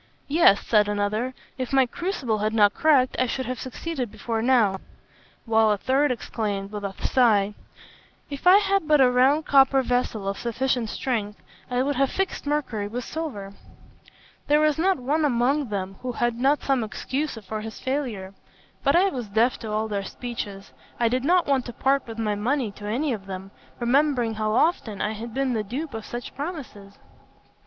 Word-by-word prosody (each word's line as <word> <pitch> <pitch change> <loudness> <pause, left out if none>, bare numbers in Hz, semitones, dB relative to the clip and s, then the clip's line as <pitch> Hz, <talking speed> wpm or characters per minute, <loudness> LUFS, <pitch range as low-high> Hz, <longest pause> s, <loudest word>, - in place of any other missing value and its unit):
'Yes,' 285 -10 +4
said 210 -2 +3
another, 210 +5 -1 0.2
'if 255 -2 -3
my 270 -1 +4
crucible 255 - -2
had 215 +1 -1
not 205 -2 +5
cracked, 280 -5 +3
I 255 - +2
should 260 +2 -3
have 255 -1 -4
succeeded 260 -1 -4
before 225 +1 -3
now;' 225 -6 +3 0.7
while 220 -1 +3
a 210 - +2
third 270 +7 +2
exclaimed, 205 -4 -3
with 210 -1 -6
a 200 -1 -3
sigh, 210 -5 +3 0.7
'If 280 +4 -4
I 370 +2 +9
had 395 -4 +1
but 300 -1 +5
had 265 - +7
a 250 - +3
round 270 +5 +3
copper 270 -1 +5
vessel 245 -5 -1
of 195 - -2
sufficient 240 -1 -1
strength, 210 -5 -3 0.3
I 250 0 +1
would 285 -1 -1
have 275 0 +2
fixed 385 -6 -3
mercury 265 -9 -1
with 240 +4 -5
silver.' 245 -12 -5 0.9
There 295 +1 +4
was 305 -1 +2
not 375 +2 +3
one 290 +5 0
among 270 0 +1
them 195 -1 -4
who 255 -1 -4
had 240 0 0
not 275 +5 +1
some 270 -4 +1
excuse 270 +7 -3
for 215 0 -6
his 220 0 -8
failure; 240 -9 -3 0.5
but 280 +2 +3
I 380 +3 +5
was 250 - -5
deaf 225 +5 +2
to 220 - -6
all 215 +1 -1
their 200 -2 -2
speeches. 200 -3 -7 0.3
I 235 -1 +3
did 255 +2 0
not 350 +4 +3
want 270 -3 +1
to 240 - -7
part 270 +1 +1
with 225 -1 -8
my 215 -2 0
money 235 +3 -1
to 205 +1 -9
any 260 +6 0
of 195 -3 -7
them, 190 0 -7 0.3
remembering 250 -1 +2
how 215 0 -1
often 225 - +1
I 210 - 0
had 225 +2 -6
been 265 +1 -1
the 220 - 0
dupe 265 +7 -5
of 220 -1 -6
such 240 0 -6
promises. 265 - -7
245 Hz, 190 wpm, -25 LUFS, 215-275 Hz, 0.9 s, I